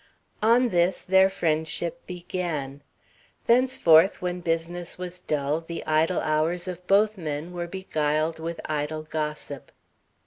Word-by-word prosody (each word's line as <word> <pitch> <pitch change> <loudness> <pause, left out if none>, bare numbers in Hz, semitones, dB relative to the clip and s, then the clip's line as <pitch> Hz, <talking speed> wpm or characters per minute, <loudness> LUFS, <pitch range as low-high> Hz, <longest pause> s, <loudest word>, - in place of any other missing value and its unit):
On 235 +3 +4
this 175 -1 +1
their 190 +1 +5
friendship 160 -2 -2
began. 170 -6 -4 0.6
Thenceforth, 230 -9 +5
when 180 0 -3
business 170 +1 -3
was 180 0 -6
dull, 150 -2 -1
the 165 0 -7
idle 160 +3 +2
hours 160 +4 0
of 180 0 -7
both 210 +1 +3
men 155 +1 -4
were 175 -1 -4
beguiled 155 -3 -1
with 165 +1 -5
idle 155 +1 -2
gossip. 150 -3 -5
170 Hz, 125 wpm, -26 LUFS, 155-180 Hz, 0.6 s, their